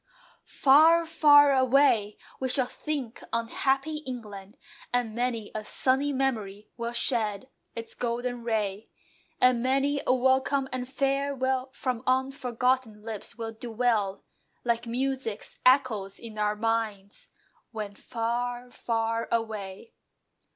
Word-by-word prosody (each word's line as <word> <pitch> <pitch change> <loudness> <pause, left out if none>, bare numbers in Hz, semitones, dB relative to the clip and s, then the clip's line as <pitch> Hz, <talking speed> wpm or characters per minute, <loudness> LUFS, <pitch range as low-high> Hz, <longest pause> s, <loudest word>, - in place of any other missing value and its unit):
Far, 320 +5 +5
far 290 -3 +6
away! 260 -5 +3 0.2
We 260 - -1
shall 255 0 +1
think 265 -3 -5
on 230 0 -1
"happy 275 +5 0
England," 215 -9 -8 0.3
And 245 -3 0
many 235 -2 -2
a 215 - -4
"sunny 265 +6 +1
memory" 220 -7 -2
will 235 0 -3
shed 230 -2 -1 0.3
its 230 -1 -6
golden 245 0 -3
ray, 215 -3 -2 0.5
And 250 -2 +4
many 275 +3 +1
a - - +5
welcome 265 +1 +2
and 250 0 -4
farewell 270 -1 0
From 250 -4 -2
unforgotten 255 -3 0
lips 220 -1 -6
will 225 -1 -5
dwell 225 -3 -1 0.4
Like 235 0 0
music's 255 -3 -3
echoes 225 -7 +3
in 220 -2 -9
our 210 0 +1
minds 215 -3 -2 0.4
When 210 -3 -6
far, 240 +3 -3
far 230 -1 -1
away. 220 -2 -3
245 Hz, 115 wpm, -27 LUFS, 220-265 Hz, 0.5 s, far